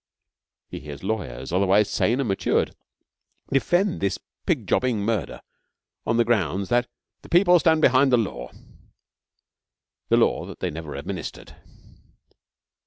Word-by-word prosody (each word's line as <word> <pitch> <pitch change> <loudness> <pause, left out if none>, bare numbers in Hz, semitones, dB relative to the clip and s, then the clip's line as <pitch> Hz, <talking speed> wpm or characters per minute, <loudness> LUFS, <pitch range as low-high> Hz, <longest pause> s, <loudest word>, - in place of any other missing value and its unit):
He - - -7
hears 75 0 -9
lawyers, 85 - -4
otherwise 100 +2 +3
sane 120 +4 +1
and 135 - 0
matured, 95 - 0 0.8
defend 175 +8 +1
this 100 -1 0 0.3
pig - - 0
jobbing 125 -5 +1
murder 105 - -2 0.7
on 115 - +1
the 120 - +3
grounds 100 -4 0
that 120 +1 +2 0.3
'the - - -15
People 175 0 +5
stand 160 0 +3
behind 130 +1 +5
the 125 - +5
Law' 80 - -3 1.6
the - - +4
law - - +1
that - - -10
they - - -2
never 80 -2 -7
administered. 85 +5 -7
110 Hz, 130 wpm, -24 LUFS, 90-130 Hz, 1.6 s, People